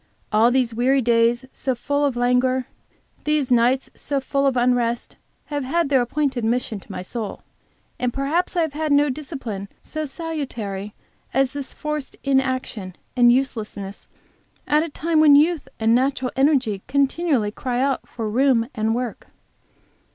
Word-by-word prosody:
All 220 +2 +5
these 245 -2 +1
weary 260 +3 +2
days 235 +1 +3
so 260 -2 -1
full 285 +4 -1
of 275 -3 0
languor, 250 +1 +2 0.6
these 300 -3 0
nights 245 +2 +3
so 280 -1 -2
full 275 +1 0
of 265 -2 +1
unrest, 240 -1 +1 0.4
have 290 -1 -1
had 315 +3 0
their 270 -3 +4
appointed 265 -1 -1
mission 225 -2 0
to - - -14
my 180 - -5
soul. 215 +2 -5 0.6
And 250 -1 0
perhaps 290 +9 -1
I 345 - +3
have 315 -3 -3
had 310 0 -2
no 285 0 +4
discipline 255 - -6 0.2
so 310 -1 -4
salutary 245 - -5 0.4
as 270 -1 +2
this 280 -2 -4
forced 300 -2 -5
inaction 260 -8 -1 0.2
and 240 -1 +6
uselessness, 215 -6 -2 0.6
at 300 +1 +3
a 330 - -2
time 320 +2 0
when 300 -2 +7
youth 315 +2 +3
and 225 0 +3
natural 260 0 +1
energy 265 -8 +2
continually 275 -3 +1
cried 245 +3 -2
out 275 0 0
for 225 -2 -5
room 240 +1 +3
and 220 +1 0
work. 245 -2 -4
260 Hz, 155 wpm, -22 LUFS, 235-285 Hz, 0.6 s, when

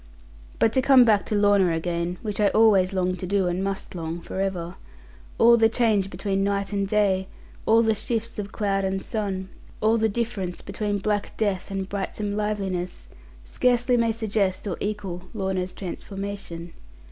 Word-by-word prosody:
But 225 - +3
to 260 - +3
come 260 -2 +7
back 210 -3 +3
to 215 - -1
Lorna 205 -3 +4
again 170 +1 -2
(which 210 -2 -3
I 210 - +4
always 200 -4 +4
longed 185 -1 -1
to 185 - -4
do, 195 0 +1
and 180 +2 -1
must 195 0 -4
long 165 -1 -4
for 190 - -6
ever), 180 -3 -2 0.6
all 235 +1 +7
the 225 -1 +5
change 220 -5 +2
between 195 -1 -1
night 200 0 -1
and 200 -1 0
day, 195 -2 +2 0.4
all 225 +1 +5
the 220 -1 +3
shifts 230 +1 -3
of 205 0 -5
cloud 195 -2 0
and 190 0 -1
sun, 190 -3 -3 0.3
all 220 +2 +3
the 220 0 +2
difference 200 -5 -3
between 210 -2 -2
black 205 +1 -2
death 200 -4 -1
and 195 -1 -3
brightsome 205 +1 -3
liveliness, 195 -4 -3 0.3
scarcely 245 - +2
may 230 -1 +2
suggest 210 -4 -1
or 185 - -2
equal 195 -4 -4
Lorna's 190 -2 -2
transformation. 195 -3 -6
200 Hz, 170 wpm, -25 LUFS, 185-215 Hz, 0.6 s, come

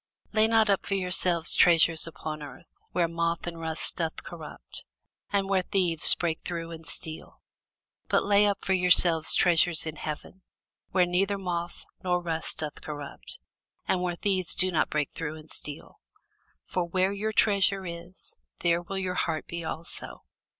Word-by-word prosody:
Lay 220 0 +4
not 225 -1 +3
up 200 -2 +1
for 195 - 0
yourselves 180 -3 +3
treasures 165 -2 +5
upon 155 -1 -7
earth, 145 +3 -12 0.2
where 175 -2 +1
moth 170 0 -2
and 170 -1 -6
rust 160 -1 -1
doth 165 -2 -3
corrupt, - - -9 0.5
and 200 -1 0
where 195 -1 +2
thieves 180 -4 +6
break 165 -2 -2
through 170 -1 -5
and 165 0 -10
steal: 160 0 -6 0.7
but - - +2
lay 205 +1 +4
up 200 - -2
for 190 - +1
yourselves 180 -3 +5
treasures 170 -2 +3
in 155 -1 -6
heaven, 155 +5 -7 0.5
where 180 -1 +3
neither 195 +3 0
moth 175 -2 -5 0.2
nor 180 -1 +1
rust 165 -2 -3
doth 155 -2 -5
corrupt, 145 -2 -8 0.5
and 180 - +1
where 180 -1 -2
thieves 185 -1 +2
do 185 +1 +2
not 160 - +1
break 150 -2 -1
through 155 -1 -5
nor 155 -1 -12
steal: 145 -1 -9 0.7
for 180 - -2
where 185 +3 0
your 215 +2 -2
treasure 195 -2 +2
is, 170 +1 -8 0.3
there 170 0 +2
will 195 +3 -6
your 185 -1 -2
heart 160 -3 -2
be 170 0 -6
also. 160 +1 -5
175 Hz, 165 wpm, -27 LUFS, 165-190 Hz, 0.7 s, thieves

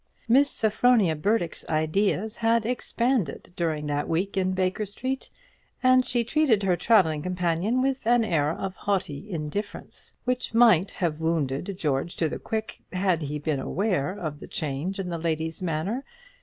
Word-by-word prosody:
Miss 275 +5 +5
Sophronia 220 -6 +3
Burdock's 175 +1 0
ideas 195 +7 0
had 230 -1 +2
expanded 235 - -1
during 155 -3 -1
that 145 0 -1
week 185 +5 -1
in 185 -1 +1
Baker 185 +3 0
Street, 255 +6 -4 0.5
and 255 0 +6
she 245 -1 0
treated 240 -4 +2
her 185 -2 +3
travelling 175 -5 +3
companion 180 +7 0
with 270 -4 -1
an 240 0 +4
air 150 -7 +1
of 190 +3 -3
haughty 195 -3 -2
indifference, 175 +4 -5
which 250 -2 -1
might 210 -6 +6
have 165 -6 -2
wounded 160 +2 -1
George 150 0 -1
to 165 - +1
the - - -5
quick 220 0 -4
had 180 -3 +1
he 150 0 -3
been 150 -1 -1
aware 180 -3 0
of 155 -7 -5
the - - -9
change 155 +6 -3
in 185 -2 -3
the 170 -1 -3
lady's 160 +1 -2
manner. 180 - -2
185 Hz, 155 wpm, -26 LUFS, 160-225 Hz, 0.5 s, and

